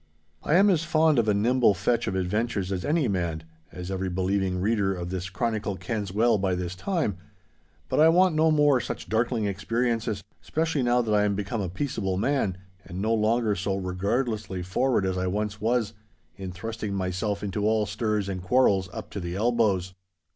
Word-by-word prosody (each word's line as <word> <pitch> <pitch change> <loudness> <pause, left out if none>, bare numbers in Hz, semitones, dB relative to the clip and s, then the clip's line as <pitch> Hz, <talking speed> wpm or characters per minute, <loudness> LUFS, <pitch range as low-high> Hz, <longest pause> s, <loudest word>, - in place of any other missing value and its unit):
I 155 - +1
am 200 +3 +6
as 165 -3 +1
fond 160 -4 +3
of 110 - +1
a 105 - +4
nimble 115 0 +3
fetch 115 +6 0
of 95 - -1
adventures 100 +1 -1
as 95 -2 -2
any 150 -2 +1
man, 85 -5 -2 0.3
as 90 +1 -7
every 95 0 -2
believing 95 0 0
reader 100 -1 +1
of 90 0 -5
this 90 -1 -4
chronicle 105 +1 -2
kens 105 -1 -4
well 110 +2 +3
by 95 -1 0
this 90 0 -3
time, 150 - -1 0.7
but - - 0
I 160 +1 +7
want 180 +1 +4
no 160 +1 +3
more 145 -4 +4
such - - -6
darkling 115 0 0
experiences—specially 115 - -2
now 120 0 +2
that 110 -2 -1
I 105 0 +4
am 100 -1 +1
become 105 +2 -3
a 95 - -2
peaceable 95 -3 -2
man, 105 -4 0 0.3
and 90 +2 -7
no 110 +3 +1
longer 110 0 +2
so 95 +1 -1
regardlessly 100 +1 -2
forward 100 +4 +1
as 95 -1 -1
I 90 - -1
once 105 +2 -2
was, 115 -1 +1 0.4
in 95 -2 -6
thrusting 105 +1 -5
myself 95 +2 -2
into 105 +1 -1
all 110 -1 +2
stirs 105 0 -1
and 95 -2 -4
quarrels 95 -2 +3
up 110 +2 -8
to 100 - -4
the 85 -1 -4
elbows. 105 -4 +1
105 Hz, 185 wpm, -26 LUFS, 95-120 Hz, 0.7 s, I